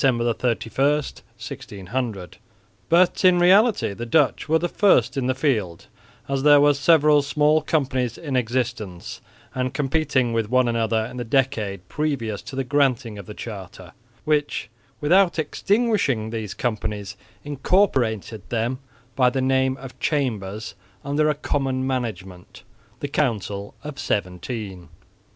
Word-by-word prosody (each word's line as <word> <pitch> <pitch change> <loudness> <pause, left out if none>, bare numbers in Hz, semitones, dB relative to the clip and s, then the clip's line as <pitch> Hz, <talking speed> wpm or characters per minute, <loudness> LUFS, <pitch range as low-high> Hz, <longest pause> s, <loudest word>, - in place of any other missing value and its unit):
31, 120 -4 +2
1600), 115 -5 -3 0.5
but 175 +3 +3
in 185 -1 +6
reality 195 - +4
the 115 - -6
Dutch 140 +5 +1
were 160 - +4
the 175 - -1
first 200 -2 +3
in 130 -2 -1
the 130 - +1
field, 110 - -1 0.4
as 135 -1 -1
there 145 0 +7
were 145 0 +5
several 150 0 +4
small 150 +2 +2
companies 130 -6 -1
in 145 -5 -4
existence 120 -6 -3 0.3
and 130 0 -2
competing 135 -4 +1
with 115 -2 -1
one 130 0 +3
another 115 -1 0
in 125 - -9
the 120 - -3
decade 110 -7 -1
previous 130 -8 -2
to 130 +4 -9
the 135 - -1
granting 130 -5 0
of 100 - -10
the 105 - -8
charter, 95 -5 -9 0.3
which 145 -8 0 0.3
without 175 +4 +3
extinguishing 175 - 0
these 110 -3 -5
companies 105 -4 -3 0.3
incorporated 130 - 0
them 120 +2 -1 0.4
by 125 -2 +4
the 130 +1 -2
name 130 0 +1
of 135 -1 -11
chambers 110 -7 -2 0.3
under 150 +2 +1
a 150 - +1
common 135 -3 -1
management, 105 -9 -5 0.4
the 145 - -2
Council 105 -8 -2
of 150 -1 -7
Seventeen. 95 -1 -4
130 Hz, 135 wpm, -23 LUFS, 110-145 Hz, 0.5 s, there